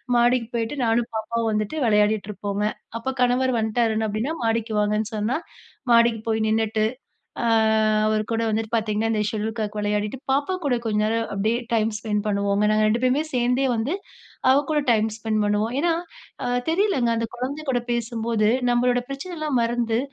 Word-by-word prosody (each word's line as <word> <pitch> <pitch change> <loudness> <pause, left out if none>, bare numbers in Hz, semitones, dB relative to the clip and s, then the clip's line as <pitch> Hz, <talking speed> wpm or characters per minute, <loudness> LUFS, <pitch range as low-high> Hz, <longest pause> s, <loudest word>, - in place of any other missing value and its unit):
மாடிக்கு 240 -1 +3
போயிட்டு 230 +3 -2
நானும், 230 +1 +2
பாப்பாவும் 225 +1 -1
வந்துட்டு 215 +5 -1
விளையாடிட்டு 210 -1 +2
இருப்போங்க. 205 0 -3 0.3
அப்ப 265 +3 -3
கணவர் 250 +1 +3
வந்துட்டாருன்னு 220 0 +1
அப்டீன்னா 220 +9 -2
'மாடிக்கு 225 -1 0
வாங்கன்னு' 210 +1 0
சொன்னா 215 +4 0 0.6
மாடிக்கு 235 -1 +5
போய் 220 -1 +1
நின்னுட்டு, 220 0 +1 0.6
அ - - 0 0.6
அவர் 215 0 +1
கூட 225 0 0
வந்துட்டு 220 +1 -2
பாத்தீங்கன்னா, 220 0 0
இந்த 215 - +1
ஷெட்யூல் 220 +1 -3
காக் 210 0 -3
விளையாடிட்டு 210 +3 -1
பாப்பா 285 +7 +1
கூட 265 -3 +2
கொஞ்ச 210 -1 0
நேரம் 225 +1 0
அப்படியே 215 +4 +1 0.2
டைம் 220 0 +2
ஸ்பென்ட் 210 -1 -2
பண்ணுவோங்க. 200 0 +1
நாங்க 215 0 +3
ரெண்டு 230 +3 0
பேருமே 265 +5 +2
சேர்ந்தே 250 +2 +2
வந்து 245 +11 -1 0.6
அவ 270 - +5
கூட 300 - +2
டைம் 220 -1 +2
ஸ்பெண்ட் 215 -1 0
பண்ணுவோம். 210 +3 0
ஏன்னா, 340 0 +2 0.5
அ - - -1 0.2
தெரியலங்க. 330 - +2
அந்த 230 0 -1
குழந்தை 280 +5 -4
கூட 245 - +1
பேசும்போது 230 -2 0 0.2
நம்பளோட 245 0 +2
பிரச்சனைலாம் 300 -2 -2
மறந்து 230 -1 0
225 Hz, 160 wpm, -23 LUFS, 215-245 Hz, 0.6 s, மாடிக்கு